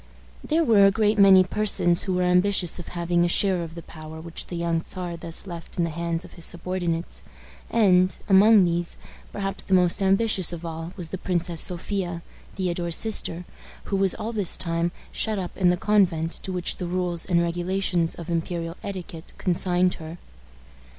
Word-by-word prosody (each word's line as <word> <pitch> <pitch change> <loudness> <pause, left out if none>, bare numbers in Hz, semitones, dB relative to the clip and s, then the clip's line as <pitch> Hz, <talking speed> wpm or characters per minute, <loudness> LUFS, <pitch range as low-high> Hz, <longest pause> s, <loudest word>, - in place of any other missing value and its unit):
There 325 +2 +1
were 210 -7 +6
a - - +4
great 210 +1 +1
many 190 -1 +8
persons 185 -3 +1
who 190 - -2
were 180 - +1
ambitious 180 0 +2
of 175 - -8
having 175 0 0
a - - +3
share 185 0 +2
of 165 -1 -7
the 170 - -8
power 155 0 -10
which 165 +1 -7
the 175 - -6
young 170 -1 -1
Czar 180 -1 -6
thus 165 +1 -4
left 170 -3 -9
in 175 - +2
the 170 - -1
hands 170 +1 -3
of 180 - -15
his 170 - -6
subordinates; 175 -1 -3 0.5
and, 185 -5 +3
among 200 0 +6
these, 170 0 -1 0.3
perhaps 195 -1 -4
the 190 - +2
most 180 +1 +2
ambitious 195 -2 +3
of 170 -1 -7
all 165 +1 -6
was 170 -3 -6
the 190 - -5
Princess 175 -3 -1
Sophia, 175 -1 -2 0.3
Theodore's 175 -3 -1
sister, 180 -5 -1 0.5
who - - +4
was 195 -1 +2
all 225 - -4
this 205 -5 0
time 170 0 0 0.2
shut 215 -1 -2
up 180 -2 -5
in 180 -2 +3
the 180 - +2
convent 180 -5 +2
to 190 - -6
which 180 -2 -2
the 180 - -4
rules 175 -1 -1
and 175 -2 +1
regulations 175 0 -1
of 170 - -9
imperial 170 0 -3
etiquette 175 -4 -7
consigned 180 0 +1
her. 160 +2 -8
180 Hz, 185 wpm, -24 LUFS, 170-190 Hz, 0.5 s, many